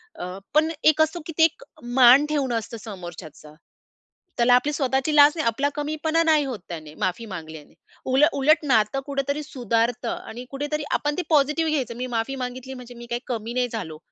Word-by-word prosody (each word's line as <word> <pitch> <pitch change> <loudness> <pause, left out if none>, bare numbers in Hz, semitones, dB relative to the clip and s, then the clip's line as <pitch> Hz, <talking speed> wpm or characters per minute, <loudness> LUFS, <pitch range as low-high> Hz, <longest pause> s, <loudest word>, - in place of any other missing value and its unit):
अ, 180 +1 -6 0.2
पण 315 +1 +4
एक 310 0 +5
असतो, 315 +2 +1
की - - -4
ते 320 - +5
एक 325 +9 +2 0.3
मान 260 +2 +7
ठेवणं 275 -5 0
असतं 230 +1 -8
समोरच्याचा. 175 -7 -10 0.8
त्याला 240 +1 +4
आपली 285 +4 +2
स्वतःची 270 +1 0
लाज 290 0 +8
नाही, 315 - -2
आपला 230 +5 +1
कमीपणा 310 +2 0
नाही 310 -3 +3
होत 255 -6 -5
त्याने, 155 -3 -8
माफी 185 +5 -2
मागल्याने. 160 -5 -9 0.4
उल 265 +3 +4
उलट 305 +3 +3
नातं 225 0 +2
कुठेतरी 280 +1 -2
सुधारत 240 -2 -1
आणि 240 +2 -6
कुठेतरी 295 +2 -3
आपण 295 0 0
ते - - +1
पॉझिटिव्ह 305 +1 +2
घ्यायचं. 260 -6 -2
मी 250 +1 -3
माफी 230 +4 -1
मागितली, 255 0 -6
म्हणजे 250 -1 -10
मी 240 0 -10
काही 240 +1 -3
कमी 230 -2 -4
नाही 250 0 +1
झालो. 170 -9 -5
260 Hz, 185 wpm, -24 LUFS, 230-295 Hz, 0.8 s, लाज